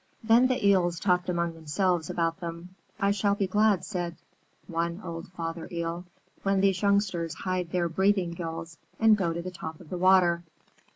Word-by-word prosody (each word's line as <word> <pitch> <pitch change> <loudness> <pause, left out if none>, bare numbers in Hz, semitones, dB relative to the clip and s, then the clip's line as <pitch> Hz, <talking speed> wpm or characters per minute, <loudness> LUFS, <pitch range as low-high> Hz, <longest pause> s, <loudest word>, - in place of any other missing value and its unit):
Then 230 +3 +5
the 255 -5 -1
Eels 175 -4 +3
talked 180 -1 +1
among 170 -1 0
themselves 165 +1 -1
about 165 0 -1
them. 170 0 -6 0.3
"I 200 -1 +2
shall 200 0 +1
be 200 - 0
glad," 205 0 +2
said 175 -4 -3 0.5
one 170 +1 -2
old 165 -2 -6
Father 165 -1 -5
Eel, 170 +1 -3 0.4
"when 195 0 +1
these 195 -1 +2
youngsters 200 -5 +1
hide 185 -2 -2
their 175 -1 0
breathing 190 +1 +1
gills 165 -1 -6 0.2
and 220 -1 +6
go 185 -5 0
to 170 +1 -4
the 185 - -5
top 160 -3 -7
of 170 - -15
the 180 - -3
water." 180 -2 +5
180 Hz, 175 wpm, -28 LUFS, 170-195 Hz, 0.5 s, and